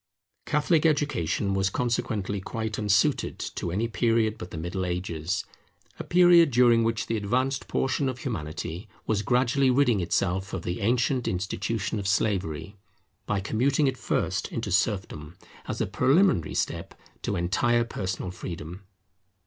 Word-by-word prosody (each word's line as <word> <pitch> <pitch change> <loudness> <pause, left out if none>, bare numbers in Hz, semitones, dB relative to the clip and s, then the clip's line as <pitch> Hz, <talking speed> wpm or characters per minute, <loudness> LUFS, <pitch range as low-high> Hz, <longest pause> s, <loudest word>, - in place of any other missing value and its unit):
Catholic 150 +2 +2
Education 145 - +1
was 95 0 +1
consequently 105 -4 -1
quite 110 +2 -4
unsuited 105 -2 +2
to - - -4
any 105 +7 -1
period 115 -1 +1
but 90 - -7
the 85 - -7
Middle 85 +3 -3
Ages; 90 0 -2 0.5
a - - -3
period 175 -2 +6
during 120 -2 +5
which 115 -1 0
the 115 - -1
advanced 130 +6 -1
portion 135 +1 0
of 130 - -4
Humanity 90 - -5 0.2
was 105 -2 0
gradually 125 +4 +2
ridding 125 -4 +3
itself 95 +2 -1
of 95 - -3
the 85 - -3
ancient 125 +3 +1
institution 100 +4 -2
of 100 - -3
slavery, 95 -4 -1 0.5
by 100 -2 0
commuting 130 +8 +1
it 135 -1 +1
first - - -1
into - - -3
serfdom, 90 -5 -1 0.3
as - - -3
a - - +2
preliminary 135 - +2
step - - -2 0.3
to 100 - -2
entire 120 +7 +2
personal 95 -5 -4
freedom. 85 0 -7
105 Hz, 140 wpm, -27 LUFS, 90-125 Hz, 0.5 s, period